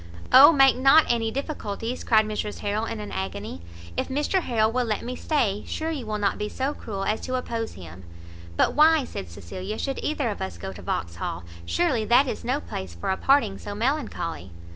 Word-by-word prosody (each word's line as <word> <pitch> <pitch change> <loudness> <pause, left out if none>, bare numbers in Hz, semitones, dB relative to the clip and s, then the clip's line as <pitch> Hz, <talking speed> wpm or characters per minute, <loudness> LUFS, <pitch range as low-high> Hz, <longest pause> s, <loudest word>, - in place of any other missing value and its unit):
"O 275 +5 +10
make 270 -3 +6
not 270 +5 +6
any 230 -2 +1
difficulties," 240 -3 -4
cried 220 -2 +4
Mrs 210 0 -4
Harrel 210 +2 -1
in 110 - -5
an 105 -1 -6
agony; 95 -1 -5 0.3
"if - - -1
Mr 295 +8 +1
Harrel 220 -6 +1
will 250 +1 +1
let 220 -3 -2
me 250 +1 -4
stay, 225 -9 0
sure 320 +1 -3
you 270 -8 -5
will 215 0 -2
not 205 0 0
be 210 0 -2
so 265 +5 -2
cruel 200 -8 -5
as 215 - 0
to 255 - -3
oppose 230 -3 -3
him?" 90 0 -11 0.5
"But - - +3
why," 310 0 +5
said 95 - -7
Cecilia, 185 - -6
"should 270 -1 -3
either 295 -5 -1
of 205 - -7
us 95 -3 -4
go 95 +3 -6
to - - -11
Vauxhall? 85 +1 -3 0.2
surely 300 -11 +1
that 245 +5 +5
is - - -4
no 255 +4 0
place 95 - -7
for 85 - -2
a - - +1
parting 255 -8 +2
so 205 - -6
melancholy." 225 - -2
225 Hz, 205 wpm, -25 LUFS, 195-270 Hz, 0.5 s, O